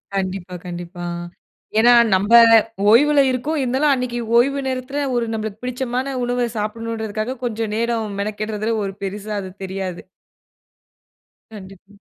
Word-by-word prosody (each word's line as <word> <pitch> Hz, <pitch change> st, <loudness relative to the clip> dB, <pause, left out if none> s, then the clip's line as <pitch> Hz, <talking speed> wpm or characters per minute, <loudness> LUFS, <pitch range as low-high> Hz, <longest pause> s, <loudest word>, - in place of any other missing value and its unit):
கண்டிப்பா, 185 Hz, -1 st, -3 dB
கண்டிப்பா. 175 Hz, 0 st, -7 dB, 0.7 s
ஏன்னா, 240 Hz, +2 st, +6 dB, 0.2 s
நம்ப 205 Hz, +5 st, +2 dB, 0.6 s
ஓய்வுல 290 Hz, +4 st, +5 dB
இருக்கோம். 285 Hz, +5 st, -2 dB
இருந்தாலும், 265 Hz, +4 st, +2 dB
அன்னைக்கு 250 Hz, -2 st, -2 dB, 0.2 s
ஓய்வு 275 Hz, +3 st, +3 dB
நேரத்துல, 260 Hz, +2 st, -3 dB
ஒரு 235 Hz, -1 st, +1 dB
நமக்குப் 220 Hz, 0 st, -5 dB
பிடிச்சமான 255 Hz, +1 st, -3 dB
உணவை 245 Hz, 0 st, 0 dB
சாப்பிடணும்கிறதுக்காகக் 220 Hz, +2 st, -4 dB
கொஞ்சம் 220 Hz, -2 st, -2 dB
நேரம் 225 Hz, -3 st, -1 dB
மெனக்கெடுறதுல, 215 Hz, +1 st, -2 dB
ஒரு 195 Hz, -, -4 dB
பெரிசா 205 Hz, +2 st, -4 dB
அது 190 Hz, -, -7 dB
தெரியாது. 190 Hz, -2 st, -5 dB, 1.5 s
கண்டிப்பா. 195 Hz, 0 st, -12 dB
225 Hz, 115 wpm, -20 LUFS, 200-250 Hz, 1.5 s, ஏன்னா